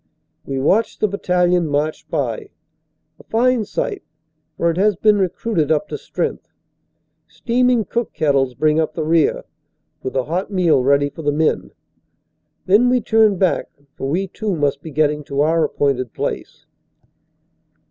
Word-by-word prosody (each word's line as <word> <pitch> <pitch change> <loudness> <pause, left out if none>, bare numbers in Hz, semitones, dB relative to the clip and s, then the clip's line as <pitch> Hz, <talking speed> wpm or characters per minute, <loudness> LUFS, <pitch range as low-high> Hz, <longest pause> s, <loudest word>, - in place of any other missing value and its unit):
We 135 - -4
watch 195 +12 +1
the 215 - +1
battalion 180 -3 +1
march 150 +2 -2
by, 425 -4 -2 0.7
a - - -15
fine 240 0 +2
sight, 405 - -3 0.6
for 170 - +2
it 165 - -6
has 205 +1 +3
been 210 +2 +3
recruited 180 -3 -1
up 160 +6 +1
to - - -4
strength. - - -4 0.8
Steaming 245 -2 +1
cook 235 -1 -2
kettles 135 -4 +1
bring 155 +4 +2
up 160 - -1
the 160 - -2
rear, 160 0 +2 0.6
with 130 - -5
a 130 - +1
hot 170 +7 -3
meal 180 -8 +3
ready 140 +2 +2
for 165 - -9
the 145 -1 +1
men. 155 +2 0 1.0
Then 210 +7 +4
we 250 0 +3
turn 220 -3 +3
back, 185 -1 +1 0.3
for 135 - -4
we 185 +6 -1
too 210 -1 -3
must 145 -2 0
be 160 - -8
getting 150 0 0
to 140 0 -1
our 160 +2 +2
appointed 135 -5 -1
place. - - -5
165 Hz, 155 wpm, -19 LUFS, 145-210 Hz, 1.0 s, Then